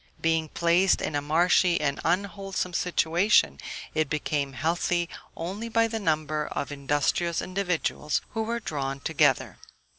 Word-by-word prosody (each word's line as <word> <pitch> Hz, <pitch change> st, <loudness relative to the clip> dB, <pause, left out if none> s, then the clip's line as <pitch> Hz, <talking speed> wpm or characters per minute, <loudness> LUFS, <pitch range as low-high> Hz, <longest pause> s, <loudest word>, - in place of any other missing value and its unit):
Being 160 Hz, -1 st, +1 dB
placed 175 Hz, +4 st, +3 dB
in -, -, -3 dB
a 145 Hz, -, +1 dB
marshy 170 Hz, +3 st, +3 dB
and 140 Hz, -2 st, -1 dB
unwholesome 195 Hz, +1 st, -1 dB
situation, 170 Hz, -, +2 dB, 0.3 s
it 155 Hz, -2 st, 0 dB
became 145 Hz, -2 st, -1 dB
healthy 170 Hz, +3 st, 0 dB, 0.3 s
only 195 Hz, +7 st, -4 dB
by 230 Hz, 0 st, +3 dB
the 225 Hz, 0 st, -3 dB
number 155 Hz, -4 st, 0 dB
of 145 Hz, -, -4 dB
industrious 145 Hz, +4 st, 0 dB
individuals 180 Hz, -5 st, -1 dB
who 225 Hz, -, -2 dB
were 230 Hz, +2 st, -2 dB
drawn 140 Hz, -8 st, -3 dB
together. 145 Hz, -3 st, +1 dB
165 Hz, 130 wpm, -27 LUFS, 150-185 Hz, 0.3 s, placed